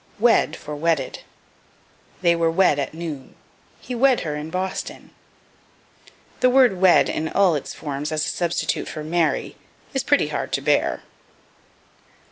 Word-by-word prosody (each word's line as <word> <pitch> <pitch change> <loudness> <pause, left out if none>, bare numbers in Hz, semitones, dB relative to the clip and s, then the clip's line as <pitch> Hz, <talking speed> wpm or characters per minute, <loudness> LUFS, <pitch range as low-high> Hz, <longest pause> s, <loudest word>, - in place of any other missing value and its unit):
Wed 225 -8 +3
for 150 0 -8
Wedded. 155 -3 -1 1.0
"They 170 -1 +4
were 165 -1 +1
wed 165 -3 +3
at 140 +2 -3
noon." 160 -5 -7 0.4
"He 255 - -7
wed 255 +1 +3
her 150 -2 -3
in 150 +1 -6
Boston." 185 +2 -5 1.3
The 255 - +4
word 250 -8 +4
wed 185 -2 +6
in 160 - -2
all 195 -3 +3
its 145 -3 -4
forms 145 0 -4
as 155 0 0
a - - -2
substitute 170 -1 -1
for 155 - -6
marry, 160 -2 -1 0.4
is - - 0
pretty - - +2
hard - - -4
to - - 0
bear. - - +1
165 Hz, 145 wpm, -22 LUFS, 150-190 Hz, 1.3 s, wed